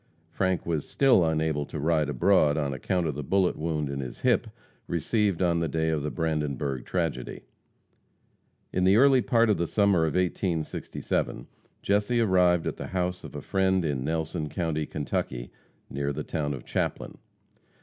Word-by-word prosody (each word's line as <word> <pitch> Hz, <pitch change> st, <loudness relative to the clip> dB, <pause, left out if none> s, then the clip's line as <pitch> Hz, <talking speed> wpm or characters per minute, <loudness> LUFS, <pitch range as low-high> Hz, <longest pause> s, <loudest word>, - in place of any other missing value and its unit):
Frank 95 Hz, +1 st, 0 dB
was 80 Hz, -4 st, -2 dB
still 130 Hz, -9 st, +4 dB
unable 80 Hz, -2 st, 0 dB
to -, -, -6 dB
ride 75 Hz, -1 st, +1 dB
abroad 75 Hz, +2 st, +3 dB
on 70 Hz, -3 st, -1 dB
account 90 Hz, +6 st, -1 dB
of 75 Hz, -, -1 dB
the 75 Hz, -, -5 dB
bullet 95 Hz, +6 st, +1 dB
wound 75 Hz, -2 st, -2 dB
in 70 Hz, 0 st, -4 dB
his 65 Hz, -3 st, -7 dB
hip -, -, +2 dB, 0.4 s
received 95 Hz, +3 st, 0 dB
on 85 Hz, -1 st, +2 dB
the 85 Hz, -, 0 dB
day 80 Hz, +1 st, 0 dB
of 80 Hz, -2 st, 0 dB
the 75 Hz, -, -2 dB
Brandenburg 75 Hz, -5 st, -2 dB
tragedy. 80 Hz, -8 st, -3 dB, 1.3 s
In 90 Hz, -, +1 dB
the 95 Hz, +2 st, +5 dB
early 135 Hz, +2 st, +6 dB
part 115 Hz, -1 st, +3 dB
of 105 Hz, -, +2 dB
the 85 Hz, -, 0 dB
summer 100 Hz, -2 st, +3 dB
of -, -, -3 dB
1867, 85 Hz, -8 st, -2 dB, 0.4 s
Jesse 105 Hz, +4 st, +1 dB
arrived 90 Hz, -5 st, +3 dB
at -, -, -3 dB
the -, -, -6 dB
house 90 Hz, -1 st, -2 dB
of -, -, -9 dB
a -, -, -6 dB
friend 95 Hz, -2 st, +1 dB
in 70 Hz, -4 st, -1 dB
Nelson 80 Hz, +1 st, -2 dB
county, 80 Hz, -4 st, -2 dB
Kentucky, 65 Hz, -4 st, -3 dB, 0.4 s
near 70 Hz, +1 st, -2 dB
the 75 Hz, +2 st, -4 dB
town 75 Hz, -3 st, -2 dB
of 65 Hz, -, -10 dB
Chaplin. -, -, -3 dB
80 Hz, 170 wpm, -27 LUFS, 75-95 Hz, 1.3 s, early